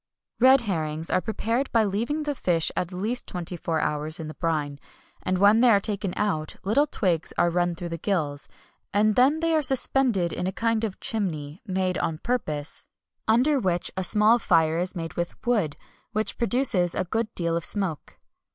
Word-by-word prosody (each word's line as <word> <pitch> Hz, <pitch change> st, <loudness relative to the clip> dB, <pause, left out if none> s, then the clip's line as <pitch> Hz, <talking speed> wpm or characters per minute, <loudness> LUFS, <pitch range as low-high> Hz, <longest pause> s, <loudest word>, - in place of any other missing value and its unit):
Red 260 Hz, +2 st, +6 dB
herrings 160 Hz, -6 st, -2 dB
are -, -, +2 dB
prepared 230 Hz, +5 st, -2 dB
by 225 Hz, -2 st, +3 dB
leaving 230 Hz, +10 st, -1 dB
the 295 Hz, -1 st, -2 dB
fish 170 Hz, -, +1 dB
at 180 Hz, 0 st, -2 dB
least 215 Hz, +7 st, -3 dB
twenty 180 Hz, 0 st, -4 dB
four 165 Hz, -1 st, -2 dB
hours 150 Hz, +2 st, -2 dB
in 160 Hz, -, -5 dB
the 155 Hz, -, -7 dB
brine; 150 Hz, -4 st, -2 dB, 0.4 s
and 185 Hz, 0 st, -1 dB
when 205 Hz, +4 st, +5 dB
they 250 Hz, -, +6 dB
are 205 Hz, -3 st, +5 dB
taken 200 Hz, -1 st, -1 dB
out, 155 Hz, -7 st, -1 dB
little 255 Hz, +10 st, +2 dB
twigs 180 Hz, -, -1 dB
are 175 Hz, -, +3 dB
run 175 Hz, 0 st, 0 dB
through 175 Hz, 0 st, -6 dB
the 165 Hz, 0 st, -5 dB
gills, 150 Hz, -7 st, -2 dB, 0.5 s
and 215 Hz, +1 st, +4 dB
then 280 Hz, +6 st, +3 dB
they 330 Hz, 0 st, +1 dB
are 315 Hz, -, +3 dB
suspended 255 Hz, -, +2 dB
in 180 Hz, -, -2 dB
a -, -, -1 dB
kind 230 Hz, +2 st, 0 dB
of 210 Hz, -4 st, -3 dB
chimney, 160 Hz, -8 st, -3 dB
made 185 Hz, -1 st, -1 dB
on 160 Hz, -, -2 dB
purpose, 155 Hz, -9 st, -3 dB, 0.4 s
under 255 Hz, +6 st, +3 dB
which 175 Hz, -5 st, -1 dB
a 190 Hz, -, -2 dB
small 215 Hz, +5 st, +5 dB
fire 165 Hz, -4 st, +2 dB
is 180 Hz, +2 st, -2 dB
made 165 Hz, -2 st, -5 dB
with 175 Hz, 0 st, -3 dB
wood, 210 Hz, -12 st, 0 dB, 0.4 s
which 215 Hz, 0 st, -1 dB
produces 235 Hz, -8 st, +2 dB
a -, -, 0 dB
good 225 Hz, +4 st, -2 dB
deal 170 Hz, -1 st, 0 dB
of 170 Hz, -, -2 dB
smoke. 190 Hz, -7 st, 0 dB
190 Hz, 190 wpm, -25 LUFS, 165-230 Hz, 0.5 s, Red